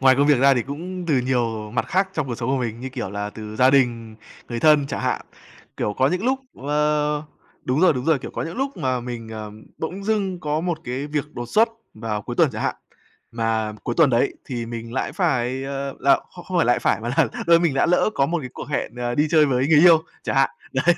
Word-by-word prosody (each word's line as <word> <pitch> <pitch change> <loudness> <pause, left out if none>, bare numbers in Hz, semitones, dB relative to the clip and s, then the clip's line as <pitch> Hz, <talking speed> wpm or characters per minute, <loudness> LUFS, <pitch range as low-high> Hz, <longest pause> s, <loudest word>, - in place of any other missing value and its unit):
ngoài 130 0 +6
công 140 +2 +3
việc 145 -4 +5
ra 140 0 +6
thì 120 - +1
cũng 175 +6 -6
từ 145 -5 +3
nhiều 115 -4 -1
mặt 120 - -1
khác 190 +1 +1
trong 150 -4 -1
cuộc 120 - -3
sống 115 +1 -4
của 135 - +2
mình 120 -2 -3
như, 130 - -4
kiểu 125 -7 -5
là, 105 +1 -4
từ 110 0 -8
gia 130 +2 +5
đình, 115 -5 +1 0.3
người 120 -1 -4
thân 150 -3 +5
chẳng - - -4
hạn. - - 0 0.6
Kiểu, 105 - -1
có 130 +5 +2
những 180 +6 -1
lúc 265 +2 +2 0.2
ờ, 150 +1 0 0.4
đúng 130 +5 0
rồi, 185 - +6
đúng 125 -3 -4
rồi, 160 -2 +3
kiểu, - - -8
có - - -4
những 165 +2 -6
lúc 270 +1 -2
mà 130 -6 -1
mình, 120 -2 -6
ờm, 110 -1 -8
bỗng 185 +5 -5
dưng 195 -4 -1
có 150 -1 -1
một 170 -2 -2
cái 130 +4 -3
việc 150 -1 -2
đột 120 - -5
xuất 220 - +4 0.3
vào 110 -1 -4
cuối 120 +4 -6
tuần 160 -5 +4
chẳng 110 - -4
hạn. - - 0 0.6
Mà 110 -2 -1
cuối - - -2
tuần 155 -5 +6
đấy 120 +3 +2
thì 120 -4 -4
mình 115 0 -6
lại 130 - -2
phải, 130 -7 0
ờ 140 0 -4
là 140 +2 +5
không 175 - -12
không 185 -1 -1
lại 120 -7 +3
phải, - - +1
mà 115 - -4
là - - +4 0.2
lơ 170 0 +7
mình 165 -5 +1
đã 135 - +3
lỡ 180 +4 +3
có 135 - +2
một 170 +4 -1
cái 130 - -6
cuộc - - -8
hẹn, 140 -4 -3
à, 120 0 -2
đi 150 +4 +2
chơi 155 -2 +5
với 130 -1 +1
người 155 -2 +6
yêu 165 -2 +7 0.2
chẳng - - -2
hạn. 135 0 +4 0.2
Đấy, 155 +7 +3
135 Hz, 250 wpm, -22 LUFS, 120-160 Hz, 0.6 s, lơ